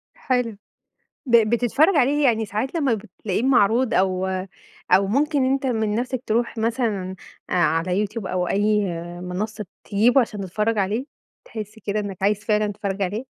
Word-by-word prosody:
حلو. 245 -5 -1 0.7
ب 235 -2 +6
بتتفرج 265 - +3
عليه 285 +2 +3
يعني 225 -3 +2
ساعات 215 - -3
لمّا 280 -7 +2
بتلاقيه 215 -1 -4
معروض 245 -1 +3
أو 185 0 +1 0.6
أو 195 0 +5
ممكن 285 +5 +1
أنت 275 0 -1
من 220 -4 0
نفسك 250 +2 -2
تروح 235 +2 0
مثلًا 220 -5 -1 0.4
على 180 +4 +1
YouTube 215 0 -6
أو 180 -1 -1
أي 210 +1 +2 0.4
منصة 210 +4 -4 0.2
تجيبه 235 +6 +4
عشان 215 -4 -3
تتفرج 210 +4 -1
عليه؟ 205 +6 0 0.4
تحس 215 -1 -8
كده 210 +1 0
إنك 200 -2 -5
عايز 205 +1 +1
فعلًا 210 -1 +2
تتفرج 200 0 -3
عليه؟ 205 +7 -2
215 Hz, 150 wpm, -23 LUFS, 200-245 Hz, 0.7 s, ب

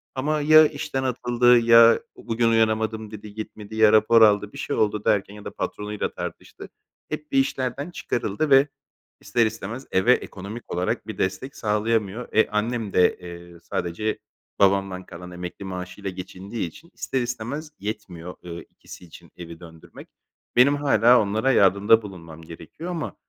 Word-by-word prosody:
ama 150 +3 -1
ya 155 +1 +7
işten 145 -3 -4
atıldı 120 -1 +3
ya 115 0 +6 0.2
bugün 115 0 -1
uyanamadım 110 -1 0
dedi, 105 -1 -10
gitmedi 110 0 -8
ya 110 -1 +5
rapor 110 +1 +5
aldı, 105 -1 +4
bir - - -10
şey - - -3
oldu 105 -1 0
derken 100 -1 +1
ya 105 0 -12
da - - -5
patronuyla 105 0 -4
tartıştı. - - -8 0.4
Hep 150 -1 -6
bir - - +1
işlerden 135 +3 -2
çıkarıldı 120 - -2
ve 135 +1 +6 0.5
ister 120 -1 +1
istemez 115 +4 -5
eve 95 +7 +4
ekonomik 100 +1 -6
olarak 90 +1 -2
bir - - -7
destek 130 +9 -3
sağlayamıyor. 110 +1 -1
E, 110 - +4
annem 110 0 -2
de, 90 - +3
eee, 85 -1 -11
sadece 85 +5 -3 0.4
babamdan 95 -1 +2
kalan 90 +1 -10
emekli 90 +2 -8
maaşıyla 95 +1 -6
geçindiği 95 +3 -6
için 160 - -15
ister 130 - -3
istemez 125 +6 -5
yetmiyor, 95 -4 -7
eee, 85 -1 -8
ikisi 90 - -14
için 85 - -16
evi 85 -1 -10
döndürmek. 80 -2 -14 0.5
Benim 135 +4 +5
hâlâ 125 -4 +4
onlara 110 +6 0
yardımda 100 +2 +4
bulunmam 85 -6 -11
gerekiyor 85 - -10
ama, 165 -3 -5
110 Hz, 150 wpm, -23 LUFS, 95-120 Hz, 0.5 s, ya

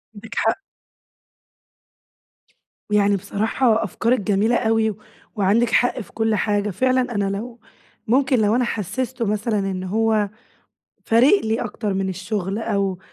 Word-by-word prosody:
عندِك 220 +2 -10
حق. 225 +12 0 2.3
يعني 205 -1 +3
بصراحة 220 +4 0
أفكارِك 230 +4 0
جميلة 210 +4 +1
أوي، 220 -2 +1 0.4
وعندِك 210 +4 +2
حق 245 0 +2
في 220 - -9
كل 220 -1 0
حاجة. 210 -1 0
فعلًا 255 +4 0
أنا 200 -1 0
لو 235 +2 -8 0.5
ممكن 260 +2 +3
لو 215 +1 +2
أنا 250 - +2
حسسته 235 +3 -3
مثلًا 210 +1 0
إن 190 -1 -3
هو 215 +1 +1 0.8
فارق 255 - +5
لي 220 +1 0
أكتر 210 -2 -3
من 190 0 -1
الشغل، 190 +1 -3
أو 200 -5 -1
220 Hz, 130 wpm, -21 LUFS, 200-235 Hz, 2.3 s, فارق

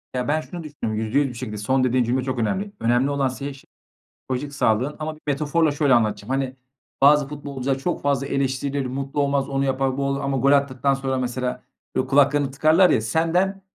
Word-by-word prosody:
Ya 125 -1 -1
ben 155 +2 +1
şunu 175 +1 -8
düşündüm, 145 -7 -4
%100 110 +7 +1
bir - - -8
şekilde 120 -3 -6
son 130 +6 +1
dediğin 130 0 +2
cümle 125 +2 0
çok 130 -1 -3
önemli. 190 - -1
Önemli 120 +4 +2
olan 140 -1 +1
senin 140 +2 -5
ş 135 -1 -15 0.5
psikolojik 135 +2 -4
sağlığın 130 +2 +1
ama 155 0 -4
bir 155 - -21
metaforla 150 +2 +1
şöyle 145 -2 +2
anlatacağım, 110 -2 +1
hani, 135 -1 -1 0.5
bazı 145 0 +6
futbolcular 140 -2 -3
çok 170 +6 -2
fazla 140 -1 0
eleştirilir, 135 0 -1
mutlu 135 +3 -2
olmaz, 140 -1 0
onu 135 0 0
yapar, 135 0 0
bu 140 - -1
olur 140 0 -1
ama 135 -1 -1
gol 135 +2 +3
attıktan 140 -1 +2
sonra, 135 -1 -2
mesela, 125 0 -3 0.3
böyle 130 - 0
kulaklarını 140 0 +3
tıkarlar 155 +6 +4
ya, - - +3
senden, 165 - 0
135 Hz, 195 wpm, -23 LUFS, 130-145 Hz, 0.5 s, bazı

